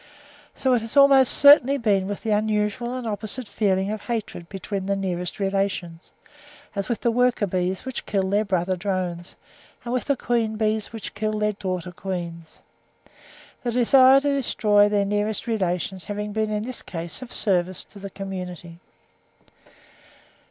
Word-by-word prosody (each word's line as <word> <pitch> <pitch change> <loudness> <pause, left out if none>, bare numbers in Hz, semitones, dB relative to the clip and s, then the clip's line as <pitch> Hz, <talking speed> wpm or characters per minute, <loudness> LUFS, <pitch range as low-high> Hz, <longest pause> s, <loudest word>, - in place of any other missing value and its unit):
So 260 -1 +1
it 240 - +2
has 225 +5 -5
almost 275 -2 +7
certainly 280 -1 +7
been 200 -6 +1
with 205 0 -5
the 220 - -1
unusual 210 +3 0
and 250 - -6
opposite 215 +3 -4
feeling 200 -1 0
of 215 -1 -4
hatred 220 -7 -5
between 195 +1 -5
the 200 - +1
nearest 180 -2 -3
relations, 195 -4 -2 0.6
as 200 -1 -3
with 235 - -2
the 235 - +2
worker 245 -2 +2
bees 185 +2 -2
which 260 -1 -5
kill 195 -2 0
their 205 +2 +2
brother 185 -2 0
drones, 180 -2 -3 0.5
and 240 - -3
with 255 - -1
the 280 -2 +1
queen 230 -3 0
bees 215 -1 0
which 225 -2 -7
kill 215 +1 -2
their 210 0 +1
daughter 185 -3 -4
queens; 170 -3 -6 1.0
the 245 - -2
desire 260 +2 +6
to 285 +1 -1
destroy 210 -6 +3
their 205 -1 +1
nearest 210 +2 -1
relations 185 -4 -2
having 210 0 -4
been 215 0 0
in 210 0 -2
this 255 +1 -6
case 170 +3 -6
of 255 - -9
service 185 -3 0
to 205 - -15
the 200 0 -7
community. 180 -3 -7
205 Hz, 160 wpm, -24 LUFS, 190-230 Hz, 1.0 s, almost